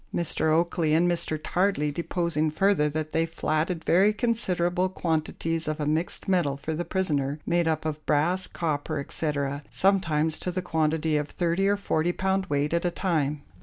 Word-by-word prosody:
Mr. 160 -2 0
Oakley 165 -1 +2
and 170 +2 +3
Mr. 170 -2 0
Tardley 175 -3 0
deposing 170 -1 -1
further, 155 -1 +2
that 155 +1 -3
they 165 0 +1
flatted 165 +1 -1
very 195 +5 +5
considerable 185 -6 0
quantities 165 -1 -2
of 155 0 -2
a 150 - -1
mixed 155 +4 -1
metal 170 -8 +1
for 160 +3 -4
the 165 +3 -2
prisoner, 150 -6 -1
made 170 -1 +1
up 160 -1 0
of 155 -1 -3
brass, 165 +5 +1
copper, 155 -1 -2
etc., 140 -1 -2
sometimes 160 -5 +1
to - - -2
the 180 0 -3
quantity 160 -2 +1
of 145 0 -2
30 175 +2 0
or 205 0 +2
40 175 -3 0
pound 190 +1 0
weight 145 +2 0
at 170 - +1
a 175 - +2
time. 150 -6 -1
165 Hz, 170 wpm, -26 LUFS, 155-180 Hz, -, very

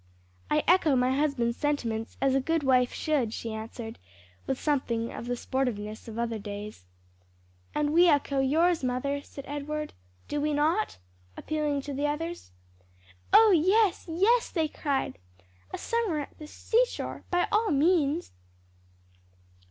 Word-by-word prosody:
"I 300 - +2
echo 345 -6 +4
my 255 +1 +2
husband's 270 -5 0
sentiments 235 -7 -2
as 270 -1 +2
a 270 - +2
good 325 +3 0
wife 255 -2 +3
should," 270 -8 0
she 225 -1 -5
answered 225 +1 -7 0.5
with 265 - -1
something 235 -6 -1
of 235 - -7
the 245 - -1
sportiveness 230 -5 -3
of 225 -1 -7
other 230 -2 -2
days. 205 - -7 0.9
"And 300 0 +1
we 345 +1 +6
echo 285 -2 +2
yours, 320 +5 +2
mother," 260 +3 -1
said 280 -1 -10
Edward. 300 +1 -4 0.3
"Do 295 - -2
we 300 0 0
not?" 320 +9 +1 0.4
appealing 300 -2 -1
to 285 +1 -6
the 285 +2 0
others. 330 +4 -4 0.8
"Oh 440 -1 +8
yes, 380 +4 +3
yes!" 425 +9 +3
they 320 -3 0
cried, 280 - -2 0.5
"a - - -4
summer 455 -9 -1
at 285 - -9
the 305 - -8
seashore, 475 +10 -1
by 355 0 +2
all 430 +1 +2
means." 310 +1 +2
290 Hz, 145 wpm, -28 LUFS, 250-325 Hz, 0.9 s, Oh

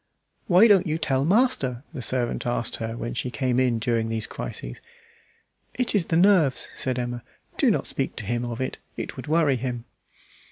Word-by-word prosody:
"Why 190 +4 +7
don't 195 -4 +5
you 155 0 0
tell 140 -5 0
master?" 165 - +2
the 130 - -5
servant 120 -1 +1
asked 120 -1 -2
her 115 0 -4
when 120 - -4
she 125 - -2
came 125 -1 0
in 125 -3 +2
during 115 0 0
these 110 -1 -2
crises. - - -6 0.9
"It 250 -1 0
is 195 -6 +1
the 165 - +1
nerves," 175 -7 +3
said 130 -1 -2
Emma. 120 -1 -3 0.3
"Do - - +3
not - - +1
speak - - -3
to - - -6
him 120 +3 -1
of 120 -1 -5
it; 130 - -3 0.2
it - - -5
would - - -8
worry 155 -4 +3
him." 120 -1 -4
130 Hz, 190 wpm, -25 LUFS, 120-165 Hz, 0.9 s, Why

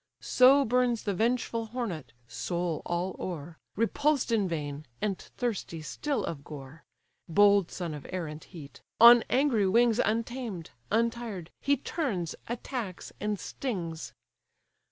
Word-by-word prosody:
So 270 +2 +6
burns 245 -1 +2
the 200 - 0
vengeful 230 +1 0
hornet 215 - -4 0.2
(soul 170 +7 -2
all 175 +2 -1
o'er), 165 -2 -6 0.2
Repulsed 265 +5 +1
in 210 -4 +2
vain, 150 -3 -4
and 205 -2 0
thirsty 200 -9 -4
still 280 - -2
of 140 -4 -5
gore; 145 +2 -10 0.5
(Bold 200 0 +5
son 170 -4 -4
of 150 - -8
air 185 -2 -3
and 150 0 -8
heat) 150 -7 -12 0.2
on 235 +1 +10
angry 255 -7 +3
wings 230 +3 +4
Untamed, 230 -5 -2 0.2
untired, 230 -6 -1
he 280 0 +2
turns, 235 - -2
attacks, 235 -5 -5
and 210 -1 -1
stings. 170 -11 -4
205 Hz, 130 wpm, -29 LUFS, 170-240 Hz, 0.5 s, on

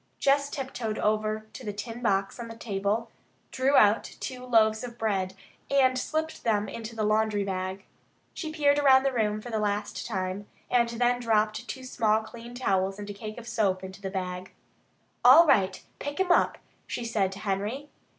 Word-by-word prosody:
Jess 280 +1 +2
tiptoed 250 -6 -4
over 215 0 0
to - - -9
the 210 - -3
tin 225 +4 -6
box 195 -2 0
on 235 - -5
the 230 - -9
table, 215 +1 -2 0.4
drew 265 +2 +2
out 210 -2 +5
the - - -10
two 250 -1 -6
loaves 220 -3 +3
of 240 -1 -7
bread, 195 -4 -1 0.3
and 265 -2 +4
slipped 315 +5 -2
them 210 -3 +1
into 230 0 -7
the 220 - -1
laundry 215 -1 +2
bag. 190 0 -4 0.5
She 315 -2 -5
peered 290 -2 +3
around 265 -2 +6
the 275 -1 +1
room 215 -3 0
for 240 - -8
the 220 - 0
last 205 0 -2
time, 190 -1 -3 0.2
and 235 -1 +3
then 245 +1 +1
dropped 215 -2 +1
two 260 - -6
small 220 -3 +1
clean 235 +2 -10
towels 195 -5 0
and 205 0 -7
a - - -6
cake 215 +2 -8
of 235 -1 -9
soap 200 -5 0
into 190 +1 -9
the 195 - -3
bag. 185 -1 -4 0.7
"All 335 - +9
right. 195 - +2 0.2
Pick 285 +3 -5
him 380 -1 +2
up," - - +3 0.3
she 240 - -4
said 210 -5 0
to 195 - -9
Henry. 210 +8 -2
220 Hz, 190 wpm, -28 LUFS, 205-245 Hz, 0.7 s, All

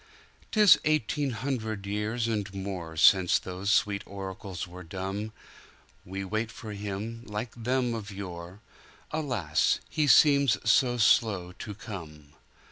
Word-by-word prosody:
"'Tis 210 -4 +6
eighteen 150 -1 +1
hundred 110 -5 -3
years 105 +3 -1
and 105 -4 -2
moreSince 95 -1 +3
those 95 +2 -5
sweet 100 -1 +2
oracles 95 -1 -6
were 90 +1 -10
dumb; 95 +5 -5 0.7
We 95 +1 -5
wait 110 +3 -2
for 110 -2 -9
Him, 105 +3 -5
like 105 +2 -4
them 125 +1 0
of 110 -3 -5
yore; 95 -1 -8 0.5
Alas, 125 - 0
He 155 -2 +1
seems 140 -3 +6
so 120 +2 +4
slow 105 -5 +3
to 105 - -6
come! 75 -8 -9
105 Hz, 125 wpm, -28 LUFS, 95-115 Hz, 0.7 s, Tis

